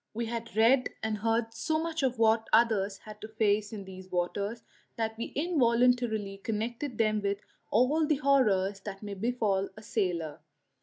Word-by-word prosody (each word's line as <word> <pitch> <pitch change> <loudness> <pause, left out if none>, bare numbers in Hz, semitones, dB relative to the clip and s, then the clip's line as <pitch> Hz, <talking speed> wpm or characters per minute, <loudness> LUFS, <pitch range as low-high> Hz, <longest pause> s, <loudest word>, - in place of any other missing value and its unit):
We 235 +1 -1
had 230 -1 -5
read 250 +4 +5
and 220 -1 -1
heard 225 +1 0
so 315 +8 -1
much 325 0 -2
of 255 -2 0
what 225 0 +3
others 210 -4 +3
had 215 - -12
had - - -34
to 215 - -6
face 215 -1 +1
in 205 -3 -7
these 185 0 -11
waters 200 +5 -2 0.3
that 220 -1 -2
we 230 - -4
involuntarily 245 - +2
connected 230 +4 -3
them 215 -1 +2
with 200 0 0 0.3
all 290 +7 +3
the 305 - +3
horrors 215 -9 +2
that 195 0 -8
may 205 -1 -5
befall 200 -2 0
a 215 - -11
sailor. 175 -9 -2
220 Hz, 170 wpm, -30 LUFS, 200-240 Hz, 0.3 s, read